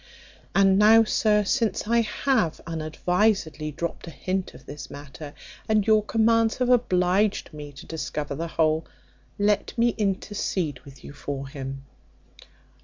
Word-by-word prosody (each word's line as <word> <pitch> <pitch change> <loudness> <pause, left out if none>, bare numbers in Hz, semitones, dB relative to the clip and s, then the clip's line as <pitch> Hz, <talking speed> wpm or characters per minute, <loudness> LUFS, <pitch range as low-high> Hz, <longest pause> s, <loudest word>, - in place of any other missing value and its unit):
And 195 0 +5
now, 220 +2 +7
sir, 210 -1 +2
since 225 0 0
I 235 +1 +3
have 225 - 0
unadvisedly 165 +1 0
dropped 170 +3 -5
a - - -5
hint 185 +3 -3
of - - -15
this 145 0 -9
matter, 145 +1 -10 0.3
and 215 -2 +3
your 215 -1 +4
commands 225 +1 +2
have 250 -1 0
obliged 195 -5 +2
me 150 -1 -8
to 135 - -12
discover 150 -2 -4
the 165 +4 -4
whole, 160 -1 +1 0.5
let 205 +2 0
me 235 +1 +4
intercede 195 -7 -2
with 140 -1 -15
you - - -10
for 140 -1 -5
him." 135 0 -7
185 Hz, 140 wpm, -25 LUFS, 150-215 Hz, 0.5 s, now